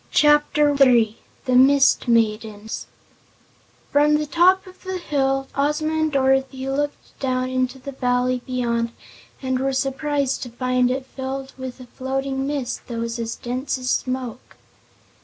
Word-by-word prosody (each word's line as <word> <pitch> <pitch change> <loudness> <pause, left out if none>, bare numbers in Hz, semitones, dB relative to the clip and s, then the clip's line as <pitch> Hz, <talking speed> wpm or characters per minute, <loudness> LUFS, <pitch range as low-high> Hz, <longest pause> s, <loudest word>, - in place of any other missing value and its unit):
Chapter 295 0 +4
Three 240 -5 +4 0.3
The 255 - 0
Mist 270 +1 +5
Maidens 220 -2 0 1.0
From 295 +1 +4
the 300 0 0
top 360 +5 +4
of 370 0 -15
the 375 -1 -3
hill 270 -5 0
Ozma 300 +2 0
and 315 -1 +1
Dorothy 265 -1 +1
looked 290 +2 -3
down 255 -1 -1
into 255 0 -1
the 265 +2 -8
valley 250 -1 0
beyond 235 -2 -1 0.5
and 260 -1 0
were 270 +1 0
surprised 275 +1 -1
to 245 - -5
find 250 +1 +1
it 260 +1 -2
filled 265 0 -6
with 260 -1 -7
a 255 - -10
floating 270 +2 -3
mist 280 -4 -3
that 235 - -5
was 230 +1 -3
as 230 0 -3
dense 255 +3 -3
as 255 -1 -2
smoke. 255 -2 -3
265 Hz, 145 wpm, -22 LUFS, 250-280 Hz, 1.0 s, Mist